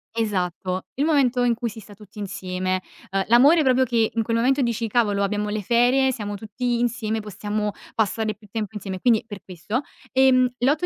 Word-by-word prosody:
Esatto, 185 -4 -2 0.2
il 285 - +3
momento 265 -6 +2
in 240 -1 +2
cui 235 0 -3
si 225 - -10
sta 205 -1 -13
tutti 210 0 -14
insieme. 185 -1 -3 0.3
Uhm, 195 0 0
l'amore 285 +8 +6
proprio 260 -1 +4
che 230 -3 +1
in 230 - 0
quel 230 +1 0
momento 265 +4 +2
dici: 235 -2 -1
"Cavolo, 205 -3 +1
abbiamo 210 +1 -1
le 210 0 -3
ferie, 245 +5 +3
siamo 205 -4 -5
tutti 235 +4 -2
insieme, 230 -2 -1
possiamo 210 0 -3 0.2
passare 220 0 0
più 210 +1 -19
tempo 220 -1 -4
insieme", 195 -2 -5
e - - -12
quindi 235 -3 +3
per 205 -4 -9
questo. 190 - -4 0.3
Ehm, 255 -1 +4
l'8 290 +7 +2
220 Hz, 195 wpm, -23 LUFS, 205-245 Hz, 0.3 s, l'amore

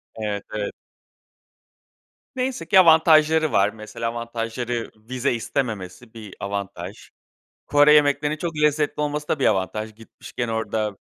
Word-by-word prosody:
Evet, 105 -2 -3
evet. 105 -1 -2 1.6
Neyse 255 -8 -2
ki, 190 - +6
avantajları 160 -2 +5
var. 100 +1 +3
Mesela, 110 +2 -5
avantajları, 115 0 -4
vize 120 +4 -2
istememesi 115 -3 -4
bir 110 -4 -10
avantaj. 100 -1 -6 0.6
Kore 145 +1 +5
yemeklerinin, 145 0 +3
çok 165 0 -4
lezzetli 150 0 +1
olması 150 0 -2
da - - 0
bir 135 - +2
avantaj. 105 +2 -1
Gitmişken 115 +2 -7
orada 110 -2 -2
120 Hz, 120 wpm, -23 LUFS, 110-150 Hz, 1.6 s, ki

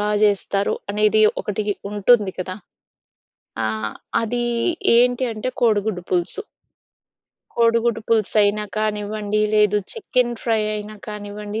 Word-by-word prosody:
బాగా 210 0 +1
జేస్తారు. 200 -1 +1 0.2
అనేది 215 +1 +3 0.2
ఒకటి 210 +1 -2 0.3
ఉంటుంది 205 -1 +3
కదా. 185 0 -4 1.1
ఆ! - - +1 0.6
అది 240 +2 -1 0.5
ఏంటి 245 +1 +3
అంటే, 215 +4 -3
కోడిగుడ్డు 210 -4 +1
పులుసు... 180 - +1 1.2
కోడిగుడ్డు 230 0 +2
పులుసు 220 -2 +1
అయినా 210 +1 +1
కానివ్వండి. 210 0 -1
లేదు, 210 -1 +4 0.2
చికెన్ 250 - 0
ఫ్రై 225 -2 +1
అయినా 210 0 -6
కానివ్వండి. 210 +1 -6
210 Hz, 110 wpm, -21 LUFS, 205-230 Hz, 1.2 s, లేదు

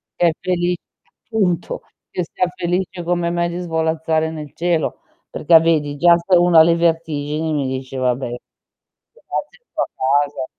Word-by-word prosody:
che 175 - +3
è - - +1
feli 180 -1 0 0.5
appunto, 200 -7 -1 0.3
che 180 - -2
sia 180 - 0
felice 180 0 -2
come 175 0 0
me 170 0 0
di 175 +1 -5
svolazzare 160 -1 0
nel 150 -3 -8
cielo, 170 -2 -1 0.3
perché 165 +1 +5
vedi 155 -3 +1
già 170 +2 +6
se 180 +2 +2
uno 175 -1 +4
ha - - +9
le 170 0 +3
vertigini 160 -2 -1
mi 140 -3 0
dice: 130 0 -5
"Vabbè, 125 0 0
grazie 485 - -10
sto - - -2
a - - 0
casa". 140 0 0
165 Hz, 160 wpm, -19 LUFS, 150-175 Hz, 0.5 s, ha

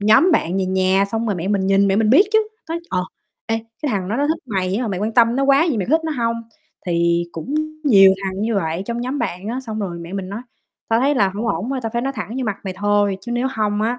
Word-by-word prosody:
nhóm 215 - +5
bạn 180 - +1
về 190 - 0
nhà, 190 +1 +2
xong 225 +1 -1
rồi 205 - 0
mẹ 175 +2 -3
mình 200 -2 +1
nhìn, 195 +1 +3
mẹ 195 - +2
mình 220 0 +3
biết 350 - +6
chứ, 435 0 +3 0.2
nói, 330 +1 -3
ờ: 180 0 0 0.4
"Ê, 225 0 0 0.3
cái 295 - 0
thằng 185 -3 -2
đó 215 - -1
nó 285 +2 +1
thích 320 0 -1
mày 190 -3 -1
á, 245 - -1
mà 225 - -2
mày 190 -2 -3
quan 215 +2 -1
tâm 235 0 +4
nó 275 - +2
quá 275 +3 +5
vậy, 285 - 0
mày 190 - -1
có 320 - +5
thích 325 - -12
nó 320 - -1
hông?" 230 0 0 0.5
Thì 170 0 +1
cũng 250 - -5 0.3
nhiều 195 -8 +7
thằng 190 0 -3
như 225 +1 0
vậy 165 -1 -1
trong 235 0 -3
nhóm 255 +4 -3
bạn 195 -5 -3
á, 250 +3 -3
xong 220 -4 -5
rồi 180 -4 -4
mẹ 170 +1 -9
mình 195 -1 -4
nói: 210 +5 -6 0.5
"Tao 225 +1 +2
thấy 280 +3 +2
là 200 -7 +3
hổng 215 +3 -3
ổn, 210 +7 -2
thôi, 270 - -1
tao 225 - -3
phải 235 - -1
nói 270 +1 -1
thẳng 215 - -4
vô 260 - -1
mặt 215 -4 -2
mày 190 -1 -4
thôi, 205 -1 +1
chứ 240 - -6
nếu 240 +2 0
hông 210 -4 -1
á, 240 +3 0
215 Hz, 290 wpm, -20 LUFS, 190-245 Hz, 0.5 s, nhiều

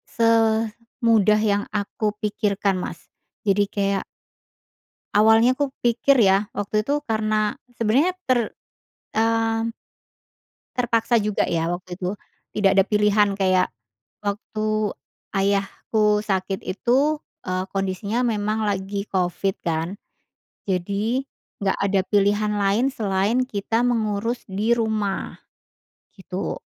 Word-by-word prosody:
semudah 225 -1 +2
yang 205 0 +1
aku 210 +1 -1
pikirkan 200 -2 0
Mas, 175 -1 -5 0.4
jadi 205 0 +3
kayak 200 -1 -1 1.1
awalnya 220 +4 +5
aku 285 0 -1
pikir 240 +4 +4
ya, 200 -1 +4
waktu 205 +1 0
itu 280 - -2 0.2
karena 215 -1 0 0.4
sebenarnya 260 +11 +2 0.2
ter 255 -1 +4 0.8
mmm 225 0 +1 1.0
terpaksa 235 -1 +2
juga 210 -1 0
ya 165 0 0
waktu 180 0 -6
itu. 180 +1 -2 0.4
Tidak 200 -2 +3
ada 195 - +6
pilihan 210 -1 +3
kayak 185 -6 +2 0.5
waktu 210 +1 -3 0.7
ayahku 200 +2 +1
sakit 190 -2 -2
itu, 260 +10 +1 0.3
eee, 185 0 -1
kondisinya 195 +4 -1
memang 215 -2 0
lagi 200 0 -2
covid 185 +1 0
kan, 165 +3 -1 0.7
jadi 200 +7 0 0.4
enggak 195 - +1
ada 195 -1 +2
pilihan 205 +1 +2
lain 200 +6 +2
selain 210 +1 +1
kita 225 +2 -1
mengurus 230 0 0
di 210 +4 -1
rumah, 215 -3 -1 0.8
gitu. 190 +1 -4
210 Hz, 105 wpm, -23 LUFS, 195-225 Hz, 1.1 s, ada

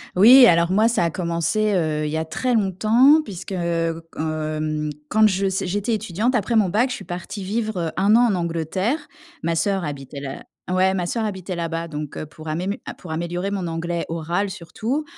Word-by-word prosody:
Oui, 245 +7 +9
alors, 170 -4 +4
moi, 215 +4 +4
ça 235 -6 +1
a - - +1
commencé, 175 +5 0
heu, 155 -4 0
il 150 - -2
y 160 - -1
a 160 - -2
très 250 +10 -1
longtemps 225 - +4
puisque, 195 - -8
heu, 165 -2 -1 0.2
hem, 155 -1 -2 0.2
quand 215 0 +5
je 195 -1 0 0.2
j'étais 205 +5 -1
étudiante 220 +4 -1
après 230 +2 0
mon 210 -4 +4
Bac, 230 +8 +2
je 250 - -3
suis - - -9
partie 185 +3 -6
vivre, 215 +1 -2
heu, 165 -2 -1
1 200 +3 +4
an 240 +1 +5
en 195 - +1
Angleterre. 175 - -2 0.4
Ma 170 - 0
sœur 195 +2 0
habitait 140 -1 -6
là, 135 -1 -6 0.3
ouais 185 +1 +3
ma 180 -2 -1
sœur 225 +5 -1
habitait 190 -3 -4
là-bas. 165 0 -3
Donc, 150 -2 -6
heu, - - -4
pour 155 +1 -13
amé 180 +6 -2 0.2
pour 180 - -9
améliorer 175 +4 -3
mon 190 -3 -2
anglais 170 +1 -3
oral 170 +5 -1
surtout, 220 - -3
180 Hz, 200 wpm, -22 LUFS, 165-215 Hz, 0.4 s, Oui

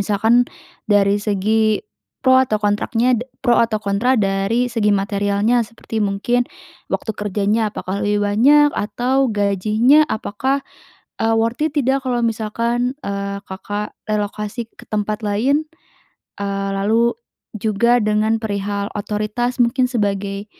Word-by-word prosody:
misalkan 220 +4 +3 0.4
dari 205 -1 +3
segi 215 - +1 0.4
pro 260 0 +6
atau 230 -5 +1
kontraknya 225 +4 +1
da 250 - -6 0.2
pro 240 -2 +4
atau 225 -2 +1
kontra 210 +6 +1
dari 200 +4 +1
segi 220 -3 +1
materialnya, 205 +3 +1
seperti 225 0 -6
mungkin 210 +5 +1 0.5
waktu 220 - -1
kerjanya 210 +2 0
apakah 195 -1 -4
lebih 205 0 +1
banyak, 285 +9 +5
atau 255 +5 0
gajinya 215 +8 +3
apakah, 260 +6 -2 0.6
eee, 225 0 +2
worth 230 +3 0
it 315 - -1
tidak 270 0 +2
kalau 245 -2 0
misalkan, 230 +3 -1
eee, 200 0 -3
Kakak 205 +2 -5 0.2
relokasi 210 +2 -3
ke - - -15
tempat 215 +1 -2
lain? 265 +10 +1 0.8
Eee, 195 0 -2
lalu 225 +4 +2 0.4
juga 220 +3 +2
dengan 215 +1 +1
perihal 200 -1 -2
otoritas 215 +5 -2
mungkin, 250 +2 +2
sebagai 200 -3 -2
215 Hz, 125 wpm, -19 LUFS, 205-240 Hz, 0.8 s, pro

